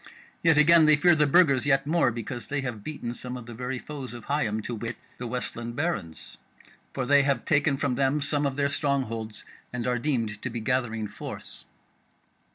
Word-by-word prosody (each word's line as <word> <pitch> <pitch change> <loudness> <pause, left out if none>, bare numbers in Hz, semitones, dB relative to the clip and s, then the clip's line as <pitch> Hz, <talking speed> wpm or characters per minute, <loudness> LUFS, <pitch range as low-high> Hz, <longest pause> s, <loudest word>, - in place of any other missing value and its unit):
Yet 165 -3 +4
again 160 +1 +7
they 155 - +7
fear 175 +4 +5
the 150 -2 +3
Burgers 140 -4 +4
yet 135 -1 +3
more, 155 -3 +3
because 120 +1 -5
they 145 -1 -1
have 120 -6 -5
beaten 130 -5 -5
some 125 +1 -6
of 125 - -9
the 120 - -9
very 125 +3 -4
foes 135 -2 -7
of 120 - -9
Higham, 110 -7 0
to 120 - -4
wit, 115 0 -4 0.2
the 125 - -4
Westland 120 -1 -4
Barons; 120 - -3 0.5
for 130 - -2
they 145 +2 +5
have 140 -3 0
taken 145 -1 +2
from 135 -1 0
them 135 +3 +1
some 145 0 0
of 135 - -3
their 140 0 +2
strong 140 -1 +1
holds, 110 -2 -6 0.3
and 125 -1 -3
are 125 -1 +1
deemed 115 -6 -1
to 125 - -3
be 120 0 -4
gathering 115 -2 -1
force." 100 - -8
130 Hz, 200 wpm, -27 LUFS, 120-145 Hz, 0.5 s, again